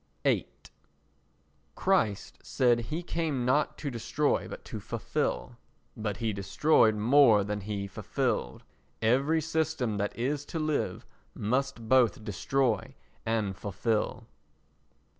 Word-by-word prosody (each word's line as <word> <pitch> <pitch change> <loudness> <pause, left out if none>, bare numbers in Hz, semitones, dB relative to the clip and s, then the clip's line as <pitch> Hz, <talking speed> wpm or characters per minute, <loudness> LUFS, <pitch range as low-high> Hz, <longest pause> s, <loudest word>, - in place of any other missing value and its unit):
viii - - +2 1.3
Christ 110 - 0
said 120 -2 +2
he 160 +3 -3
came 160 -7 -1
not 135 +4 +2
to 145 - -4
destroy 140 +5 0
but - - -9
to - - -6
fulfil—but 105 -2 -4
he 110 -2 -1
destroyed 110 +4 +3
more 115 -1 +5
than 105 +1 -3
he 100 0 -3
fulfilled. 95 - -2 0.4
Every 135 +8 +3
system 160 -8 -1
that 100 0 -2
is 140 +4 -1
to 165 - -5
live 155 -1 -1 0.3
must 125 +1 -1
both 120 -5 +3
destroy 110 +3 0 0.3
and 110 -4 0
fulfil. 105 +4 -2
120 Hz, 110 wpm, -29 LUFS, 105-145 Hz, 1.3 s, more